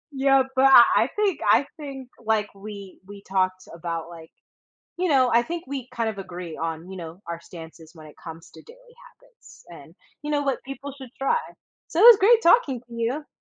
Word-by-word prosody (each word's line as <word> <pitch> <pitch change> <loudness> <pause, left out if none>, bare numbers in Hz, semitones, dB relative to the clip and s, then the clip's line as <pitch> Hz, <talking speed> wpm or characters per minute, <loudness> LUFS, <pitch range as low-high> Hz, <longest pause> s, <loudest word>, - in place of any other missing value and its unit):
Yeah, 270 0 +3
but 265 +1 +4
I 265 -3 +9 0.2
I - - -7
think 410 -6 0
I 280 - +4
think, 270 -4 -9
like, 220 -1 0
we 200 -1 -10
we 200 0 -12
talked 185 -1 -1
about, 165 0 -5
like, 165 -1 -13 0.7
you 365 0 0
know 260 -5 +3
I 235 - +4
think 335 +6 -6
we 265 -2 -6
kind 230 -1 -1
of 200 - -10
agree 180 -3 -8
on, 165 +2 -5
you 190 - -8
know, 170 +1 -9
our 170 0 -5
stances 165 -1 -13
when 155 -2 -13
it 150 - -17
comes 165 0 -11
to - - -15
daily 485 +1 -18 0.3
habits, - - -20
and, - - -14 0.3
you 300 - -5
know, 290 -1 +1
what 275 -2 -1
people 275 +1 -8
should 260 -3 -11
try. 275 - +1 0.5
So, 330 - -2
it 450 - +8
was 470 -4 +10
great 455 +4 +5
talking 335 - +3
to 240 -1 -20
you. 240 +6 -3
240 Hz, 205 wpm, -24 LUFS, 180-290 Hz, 0.7 s, was